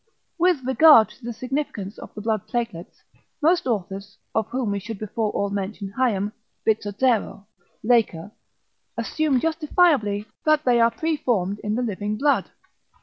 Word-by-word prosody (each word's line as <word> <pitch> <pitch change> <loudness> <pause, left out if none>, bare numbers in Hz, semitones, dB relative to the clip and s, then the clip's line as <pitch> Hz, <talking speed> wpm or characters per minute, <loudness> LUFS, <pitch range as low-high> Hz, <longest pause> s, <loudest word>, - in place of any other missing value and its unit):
With 345 -6 +3
regard 265 -3 +7
to - - -18
the 240 - -3
significance 235 -4 -4
of - - -10
the 210 - -6
blood 215 -2 -1
platelets, 230 -8 -4 0.4
most 335 +1 +2
authors, 200 -2 -3 0.2
of 220 -1 0
whom 245 -4 -2
we 200 - -1
should 215 +2 -7
before 215 +1 -2
all 200 0 -1
mention 200 0 -4
Hayem, 210 -6 +1 0.3
Bizzozero, 215 0 0 0.4
Laker, 215 -6 +1 0.7
assume 305 -5 0
justifiably 305 - +2 0.2
that 310 0 +3
they 240 -2 +4
are 230 - +6
preformed 235 - -1
in 210 +1 -2
the 250 - -1
living 210 -1 -3
blood. 285 +3 +1
225 Hz, 145 wpm, -23 LUFS, 205-265 Hz, 0.7 s, regard